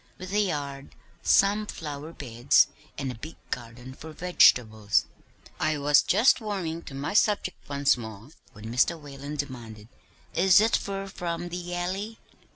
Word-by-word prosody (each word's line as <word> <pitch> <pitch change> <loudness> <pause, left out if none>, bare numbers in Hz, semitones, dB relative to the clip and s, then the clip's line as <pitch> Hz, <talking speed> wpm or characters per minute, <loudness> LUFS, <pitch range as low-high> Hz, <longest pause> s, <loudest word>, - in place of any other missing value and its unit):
'With 185 +1 -8
a 210 - +3
yard, 145 -8 -3 0.3
some 205 +2 +3
flower 150 -2 -6
beds, 125 -4 +2 0.3
and 135 -2 -3
a 120 - -11
big 155 +6 -8 0.2
garden 120 +1 -6
for 160 +4 -10
vegetables.' 110 - +3 0.5
I 155 -1 +1
was 145 0 +5
just 225 +6 +4
warming 185 -6 -3
to 135 - -8
my 140 +7 -3
subject 205 -5 +1
once 140 0 +3
more 110 0 -9 0.2
when 105 - -12
Mr. 160 +7 +2
Whalen 145 0 -8
demanded, 120 -7 -7 0.4
'Is 185 +3 +6
it 220 +2 +3
fur 195 0 -3
from 175 -3 -4
the 175 0 -5
Alley?' 195 +5 -3
150 Hz, 150 wpm, -27 LUFS, 130-185 Hz, 0.5 s, Is